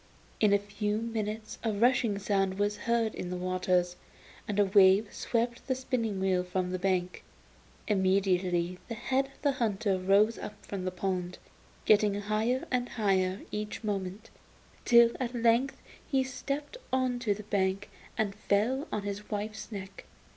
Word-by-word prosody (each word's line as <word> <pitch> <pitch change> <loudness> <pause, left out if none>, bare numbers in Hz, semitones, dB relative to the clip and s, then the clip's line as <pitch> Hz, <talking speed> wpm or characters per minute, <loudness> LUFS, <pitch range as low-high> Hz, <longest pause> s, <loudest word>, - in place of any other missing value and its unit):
In 210 -2 +4
a 200 - +6
few 205 +1 -2
minutes 220 -1 -4
a 225 - +1
rushing 230 0 +2
sound 195 -1 0
was 205 +1 +1
heard 230 -2 +2
in 180 - -5
the 180 - -3
waters, 180 -1 0 0.5
and 205 - -2
a 205 - +6
wave 195 +1 +5
swept 240 +1 -2
the 260 - +1
spinning 240 -6 -2
wheel 190 -1 +1
from 180 0 -2
the 185 - -2
bank. 180 -1 -1 0.6
Immediately 185 -3 +1
the 230 - -4
head 260 +4 0
of 275 - -22
the 285 - +4
hunter 210 -6 0
rose 200 +4 +3
up 210 - -6
from 190 -2 -5
the 185 - -1
pond, 180 -1 -3 0.5
getting 210 -1 +4
higher 215 +5 0
and 245 -1 0
higher 190 -3 +1
each 210 +2 -4
moment, 200 0 -4 0.5
till 235 -1 +7
at 250 -1 -3
length 235 +3 +2 0.3
he 270 -2 +2
stepped 280 - -4
on 255 -1 +1
to 215 -5 0
the 210 - -8
bank 195 -1 0 0.3
and 215 -3 0
fell 215 +8 0
on 210 - -2
his 205 +1 -5
wife's 215 +1 -4
neck. 195 -2 -8
205 Hz, 160 wpm, -30 LUFS, 190-230 Hz, 0.6 s, till